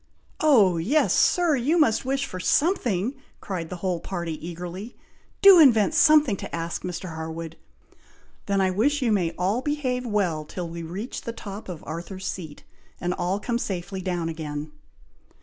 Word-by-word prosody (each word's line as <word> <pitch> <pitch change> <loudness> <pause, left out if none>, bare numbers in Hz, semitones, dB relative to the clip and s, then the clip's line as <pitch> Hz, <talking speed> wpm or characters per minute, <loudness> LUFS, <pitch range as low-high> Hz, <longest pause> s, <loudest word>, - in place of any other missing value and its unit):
"O 220 - +5
yes, 250 - +2
Sir! 345 -4 +3
you 275 +7 +1
must 235 -7 +3
wish 275 +1 0
for 185 - -7
something!" 245 - +1 0.3
cried 175 -4 -5
the - - -5
whole 180 -2 0
party, 170 -2 -4
eagerly. 175 +6 -7 0.5
"Do 390 -3 +10
invent 245 -4 +6
something 305 -7 +5
to - - -6
ask, 170 0 -4
Mr. 180 -1 -5
Harwood!" 160 0 -6 0.9
"Then 200 -1 +1
I 190 -1 +2
wish 270 +9 +1
you 235 - +2
may 185 -5 +2
all 195 +7 0
behave 260 -4 -1
well 195 -9 0
till 175 +3 -6
we 170 0 -7
reach 185 +9 -6
the 230 - -5
top 205 -2 -8
of 170 -4 -7
Arthur's 175 +4 -6
Seat, 160 -7 -6 0.4
and 175 0 -1
all 180 +3 -1
come 235 +2 -2
safely 190 -2 -4
down 175 -3 -2
again." 155 -2 -5
190 Hz, 165 wpm, -25 LUFS, 170-250 Hz, 0.9 s, Do